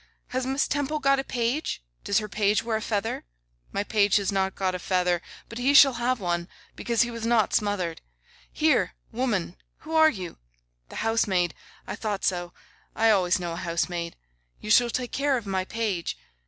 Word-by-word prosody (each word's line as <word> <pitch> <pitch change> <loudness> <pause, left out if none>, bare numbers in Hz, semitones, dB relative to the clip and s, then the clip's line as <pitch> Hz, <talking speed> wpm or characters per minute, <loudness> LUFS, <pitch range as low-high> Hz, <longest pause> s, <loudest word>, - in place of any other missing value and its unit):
Has 255 0 -2
Miss 270 +2 +1
Temple 290 +1 -1
got 275 -2 +3
a - - -1
page? 245 - -2 0.2
Does 200 - +1
her 215 -1 0
page 205 +1 +1
wear 230 -1 -1
a - - -5
feather? 215 0 -2 0.5
My 200 - -1
page 205 -1 +2
has 200 -1 +2
not 190 -1 0
got 190 -1 0
a 180 - -3
feather, 180 -1 +1 0.3
but 230 - -7
he 270 +3 +3
shall 275 -1 +9
have 250 +1 +1
one, 175 -2 -2 0.3
because 235 -1 +1
he 240 - -3
was 230 -1 -6
not 230 -2 +2
smothered. 195 -6 0 0.5
Here! - - +2 0.2
woman, 215 -8 -1 0.2
who 315 +1 -8
are 315 -1 +7
you? 185 - -7 0.5
The - - -11
housemaid. 195 -7 +2 0.3
I - - -5
thought 210 -3 -3
so. 175 -2 0 0.4
I 225 0 +4
always 185 -3 +3
know 175 -1 -3
a - - -5
housemaid. 170 0 -2 0.4
You 210 - -4
shall 240 +1 +6
take 245 +1 -3
care 275 -1 +1
of 235 - -6
my 190 -1 -1
page. 205 - -2
210 Hz, 185 wpm, -26 LUFS, 185-240 Hz, 0.5 s, shall